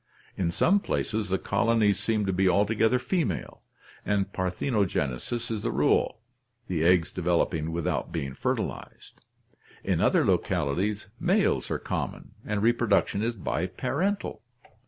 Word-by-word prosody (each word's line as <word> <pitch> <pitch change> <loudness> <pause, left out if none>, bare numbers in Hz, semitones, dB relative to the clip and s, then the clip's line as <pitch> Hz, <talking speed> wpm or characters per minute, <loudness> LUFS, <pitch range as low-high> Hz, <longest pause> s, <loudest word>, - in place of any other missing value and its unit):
In 90 -3 0
some 185 - +3
places 110 - -2
the 95 - +1
colonies 105 0 +2
seem 110 -2 +1
to 95 - 0
be 95 +1 +3
altogether 110 +5 +3
female, 125 - -2 0.4
and 100 -1 0
parthenogenesis 95 - -1
is 110 -2 -2
the - - -1
rule, 110 - +1 0.5
the 85 -4 -1
eggs 85 0 +4
developing 85 -2 0
without 85 -1 -2
being 70 -1 -3
fertilized. - - -4 0.6
In - - 0
other - - +3
localities 95 +9 0
males - - +2
are - - 0
common - - -4
and 105 -1 -2
reproduction 115 -3 +2
is 115 +1 -1
biparental. 130 - -2
100 Hz, 125 wpm, -27 LUFS, 90-115 Hz, 0.6 s, eggs